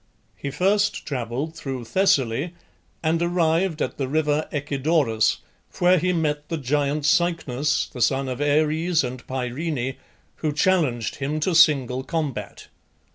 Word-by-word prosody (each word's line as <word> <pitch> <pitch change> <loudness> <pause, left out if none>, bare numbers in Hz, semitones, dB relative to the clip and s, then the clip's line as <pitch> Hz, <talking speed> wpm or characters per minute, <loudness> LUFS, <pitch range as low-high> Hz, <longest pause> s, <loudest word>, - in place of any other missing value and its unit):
He 140 - -5
first 200 +7 +1
travelled 130 +3 -3
through 135 -6 -5
Thessaly 140 - +1 0.5
and 165 +1 +1
arrived 170 0 +1
at - - -5
the 135 - -1
river 150 +1 0
Echedorus, 140 -5 +1 0.4
where 180 0 +4
he 180 +3 +1
met 150 -3 -1
the 165 - -2
giant 145 +1 0
Cycnus, 150 -5 +1
the 125 - -8
son 135 +3 +2
of 130 +1 -4
Ares 155 +3 +2
and 125 0 -5
Pyrene, 130 +1 -3 0.4
who 155 -2 -1
challenged 145 -7 +1
him 145 +3 -2
to 180 +4 +1
single 140 -6 +4
combat. 155 -4 -4
150 Hz, 130 wpm, -23 LUFS, 135-165 Hz, 0.5 s, where